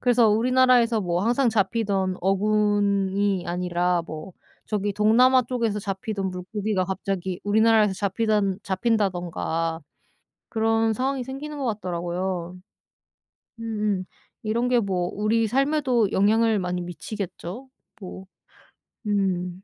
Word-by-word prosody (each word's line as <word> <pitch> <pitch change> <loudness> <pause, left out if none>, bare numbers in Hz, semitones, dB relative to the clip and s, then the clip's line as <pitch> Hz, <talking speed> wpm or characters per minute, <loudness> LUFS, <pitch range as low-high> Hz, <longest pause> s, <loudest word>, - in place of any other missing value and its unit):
그래서 240 -2 +4
우리나라에서 240 +1 +4
뭐 175 -1 -1
항상 245 +2 +2
잡히던 200 -3 0
어군이 200 -1 +1
아니라 180 0 0
뭐 155 +4 -8 0.3
저기 205 -1 -1
동남아 240 +6 +5
쪽에서 230 -3 -1
잡히던 195 0 -3
물고기가 190 +2 -2
갑자기 190 -1 -3
우리나라에서 215 -1 +3
잡히단 200 -1 0
잡힌다든가 180 -6 -1 0.7
그런 225 0 +1
상황이 260 +3 -1
생기는 280 +4 -7
것 275 - -3
같더라고요. 180 -2 -3 1.0
음음. 210 -4 -1 0.4
이런 235 +3 0
게 250 - +3
뭐 185 -5 -1
우리 220 +2 +1
삶에도 260 -3 +1
영향을 220 +2 +3
많이 180 -1 -2
미치겠죠? 195 +5 -7 0.3
뭐 190 -1 -9 0.8
음. 185 -3 -1
205 Hz, 275 characters per minute, -24 LUFS, 185-225 Hz, 1.0 s, 동남아